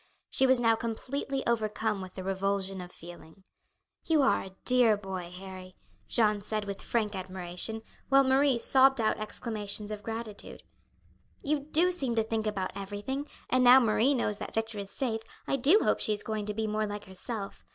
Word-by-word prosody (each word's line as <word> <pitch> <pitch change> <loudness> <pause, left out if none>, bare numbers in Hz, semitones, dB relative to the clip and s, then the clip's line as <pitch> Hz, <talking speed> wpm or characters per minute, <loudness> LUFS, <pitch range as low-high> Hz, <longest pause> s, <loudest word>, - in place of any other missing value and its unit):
She 265 - +3
was 260 -1 +4
now 230 -1 +4
completely 265 +4 -3
overcome 215 -2 0
with 185 0 -9
the 185 - -6
revulsion 195 0 -1
of 180 0 -9
feeling. 170 +1 -12 0.6
"You 315 -3 +3
are 265 - +3
a 190 0 -11
dear 245 -4 +5
boy, 190 -3 -6
Harry!" 185 0 -10 0.3
Jeanne 210 -3 +2
said 215 0 -3
with 200 -1 -5
frank 215 -3 -1
admiration, 185 +3 -3 0.3
while 275 0 +6
Marie 265 0 +3
sobbed 270 +2 +5
out 220 -1 +1
exclamations 215 -1 -4
of 210 -1 -5
gratitude. 225 -1 -7 0.8
"You 295 +1 +1
do 310 +5 +2
seem 270 -10 -1
to 225 - +2
think 220 0 -2
about 195 -3 -2
everything; 205 +9 -4 0.2
and 255 0 +2
now 250 +1 +9
Marie 235 +3 +3
knows 210 -4 0
that - - -6
Victor 225 -1 -2
is 200 -1 -6
safe, 225 0 -2 0.2
I - - 0
do 290 - +5
hope - - +2
she 215 - +1
is 205 - +2
going 215 -1 -3
to 210 - -1
be 220 0 -1
more 215 0 -1
like 205 0 -6
herself. 195 +2 -5
215 Hz, 185 wpm, -29 LUFS, 200-250 Hz, 0.8 s, now